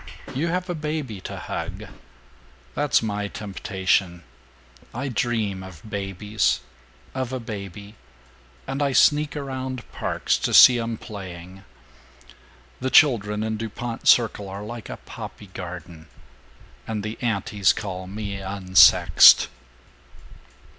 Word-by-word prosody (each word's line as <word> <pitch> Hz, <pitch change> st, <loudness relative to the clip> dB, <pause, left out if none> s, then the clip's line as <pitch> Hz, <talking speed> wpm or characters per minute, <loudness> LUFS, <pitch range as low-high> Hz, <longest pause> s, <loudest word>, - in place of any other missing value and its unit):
You 150 Hz, +6 st, -1 dB
have 180 Hz, +2 st, -2 dB
a 175 Hz, -, -2 dB
baby 150 Hz, -, -4 dB
to -, -, -7 dB
hug. -, -, -5 dB, 0.9 s
That's 145 Hz, -5 st, +1 dB
my 105 Hz, -1 st, -2 dB
temptation. 95 Hz, -3 st, -2 dB, 0.7 s
I 135 Hz, +3 st, -3 dB
dream 110 Hz, -5 st, -1 dB
of 95 Hz, 0 st, -12 dB
babies 100 Hz, 0 st, -1 dB, 0.5 s
of 130 Hz, -1 st, -3 dB
a 130 Hz, -, -3 dB
baby 100 Hz, -2 st, -8 dB, 0.7 s
and 135 Hz, +2 st, -4 dB
I 140 Hz, -2 st, +1 dB
sneak 150 Hz, +2 st, +3 dB
around 130 Hz, -3 st, -5 dB
parks -, -, -1 dB
to -, -, 0 dB
see 125 Hz, -2 st, +9 dB
them 115 Hz, -1 st, -3 dB
playing. 95 Hz, -3 st, -10 dB, 1.2 s
(The 130 Hz, -, -2 dB
children 110 Hz, -7 st, +4 dB
in 110 Hz, 0 st, -2 dB
Dupont 115 Hz, +1 st, -5 dB
Circle 110 Hz, -4 st, +4 dB
are 100 Hz, +2 st, -7 dB
like 115 Hz, +1 st, -8 dB
a -, -, -6 dB
poppy 100 Hz, -3 st, -10 dB
garden.) 85 Hz, -3 st, -8 dB, 0.8 s
And 110 Hz, -2 st, -3 dB
the 110 Hz, +1 st, -6 dB
antis 105 Hz, -3 st, +1 dB
call 95 Hz, -3 st, -5 dB
me 100 Hz, 0 st, -5 dB
'unsexed'!" 95 Hz, -1 st, +6 dB
105 Hz, 120 wpm, -23 LUFS, 95-125 Hz, 1.2 s, see